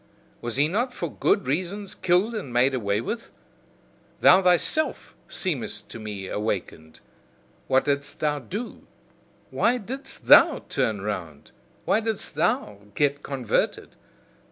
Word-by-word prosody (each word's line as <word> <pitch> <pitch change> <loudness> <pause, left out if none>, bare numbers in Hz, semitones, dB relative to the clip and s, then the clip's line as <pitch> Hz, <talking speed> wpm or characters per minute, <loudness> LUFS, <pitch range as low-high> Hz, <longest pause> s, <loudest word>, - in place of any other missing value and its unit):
Was 120 -1 -3
he 145 +3 +3
not 240 +9 -1
for - - -5
good 200 - +2
reasons 185 +8 -2
killed 185 +6 +2
and 205 - -5
made 125 +3 +3
away 105 -4 0
with? 225 - -5 0.9
Thou 190 - +7
thyself 180 - +1
seemest 125 - -3
to 115 - -7
me 105 -3 -6
awakened: 95 -7 -4 0.7
what 135 0 +3
didst 140 -1 -1
thou 150 -1 0
do? 210 - -7 0.6
why 245 +2 +2
didst 255 +5 -7
THOU - - +7
turn 105 -3 0
round? 90 -8 -5 0.3
Why - - +3
didst 225 -2 -3
THOU 105 0 -1
get 145 -1 +1
converted? 130 -5 -1
140 Hz, 130 wpm, -25 LUFS, -, 0.9 s, Thou